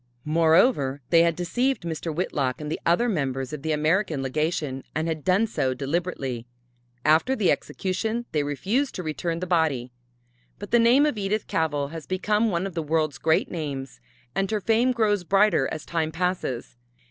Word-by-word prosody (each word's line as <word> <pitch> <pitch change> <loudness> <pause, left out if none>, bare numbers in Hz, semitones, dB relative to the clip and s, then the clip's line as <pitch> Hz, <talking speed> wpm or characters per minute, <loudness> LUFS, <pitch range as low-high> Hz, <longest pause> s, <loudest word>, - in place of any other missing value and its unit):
Moreover 160 - +3
they 165 - +7
had 170 -1 +3
deceived 245 +10 0
Mr. 165 0 -3
Whitlock 145 -6 -1
and 150 0 -5
the - - -2
other 175 +9 +3
members 135 - -2
of 150 - -5
the 160 +2 -2
American 155 0 +1
Legation, 150 -1 -2
and 160 +2 0
had 155 -2 -3
done 190 +4 +3
so 130 - -1
deliberately. 135 -4 -3 0.6
After 160 +13 +4
the 210 -7 +3
execution 220 +5 -2
they 150 - +1
refused 200 - -1
to 180 - -4
return 165 +2 -3
the - - -1
body. 155 -8 +1 0.7
But 205 - -9
the 240 - +5
name 245 +5 +5
of 290 -8 -1
Edith 205 +2 -1
Cavell 145 -3 -1
has 160 -1 -8
become 210 +4 +1
one 175 -1 -1
of 195 - -5
the 165 - -2
world's 155 -3 0
great 160 +3 +2
names 135 -6 -5 0.3
and 195 0 0
her 215 - 0
fame 230 +5 +2
grows 210 -5 +1
brighter 195 -6 +3
as 155 - -5
time 160 -2 -1
passes. 165 -9 -2
165 Hz, 175 wpm, -25 LUFS, 150-195 Hz, 0.7 s, they